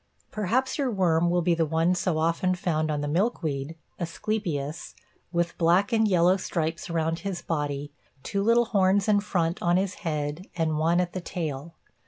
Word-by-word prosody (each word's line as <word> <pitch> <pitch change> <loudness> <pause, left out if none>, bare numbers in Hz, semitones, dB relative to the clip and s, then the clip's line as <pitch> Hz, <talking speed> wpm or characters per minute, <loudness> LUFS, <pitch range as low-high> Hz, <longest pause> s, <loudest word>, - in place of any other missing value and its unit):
Perhaps 240 +8 0
your 275 -3 +1
worm 175 -5 +2
will 175 0 +1
be 175 0 +3
the 165 0 +1
one 165 +3 +2
so 180 -2 0
often 170 +3 +1
found 160 -3 -1
on 150 -1 -1
the 145 - -2
milkweed 160 - -1 0.2
(asclepias) 170 -4 -3 0.4
with 170 -1 0
black 180 +6 +3
and 220 -1 +4
yellow 180 -1 +4
stripes 170 -1 -3
around 165 0 -1
his 180 -1 -4
body, 145 -3 -3 0.3
two 200 - -1
little 230 +3 +4
horns 195 -1 +2
in 210 -1 +4
front 175 -4 -1
on 175 0 +3
his 190 0 0
head 150 0 -3
and 160 -2 0
one 165 +2 +3
at 180 -1 -1
the 185 - -4
tail. 160 -3 -5
170 Hz, 175 wpm, -26 LUFS, 160-190 Hz, 0.4 s, and